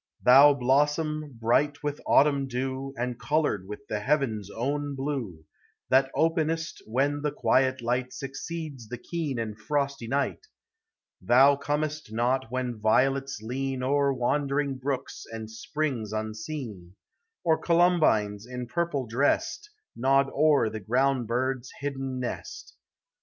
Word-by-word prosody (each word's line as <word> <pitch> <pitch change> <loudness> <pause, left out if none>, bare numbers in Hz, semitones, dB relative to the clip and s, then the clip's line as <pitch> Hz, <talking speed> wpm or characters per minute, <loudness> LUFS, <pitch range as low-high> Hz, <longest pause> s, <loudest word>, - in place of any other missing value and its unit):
Thou 140 +3 +8
blossom, 150 +2 +1
bright 145 +6 +1
with 145 0 -3
autumn 140 -1 +4
dew, 130 +1 -3
And 120 0 -3
colored 125 -6 0
with 105 +7 -8
the 105 - -2
heaven's 115 -5 0
own 145 +5 -2
blue, 130 - -4 0.4
That 135 +1 +4
openest 165 0 0
when 140 +5 0
the 150 0 0
quiet 130 -2 +2
light 125 +1 -1
Succeeds 140 -1 -6
the 125 - -5
keen 150 0 -3
and 110 -2 -3
frosty 140 +2 -2
night; 140 - -1 0.7
Thou 135 +4 +6
comest 150 -1 -3
not 125 +2 0
when 125 -2 -3
violets 135 +3 +1
lean 130 +2 -3
O'er 140 +1 +2
wandering 140 +1 0
brooks 135 0 -4
and 110 -1 -7
springs 120 -2 -3
unseen, 110 - -5 0.5
Or 160 -2 +3
columbines, 155 - +2
in 125 0 -5
purple 155 -1 -1
dressed, 140 - 0 0.3
Nod 135 +2 +2
o'er 150 -4 +3
the 110 - -5
ground 125 +4 +1
bird's 125 +1 -1
hidden 135 -2 -3
nest. 125 - -6
135 Hz, 125 wpm, -27 LUFS, 120-145 Hz, 0.7 s, Thou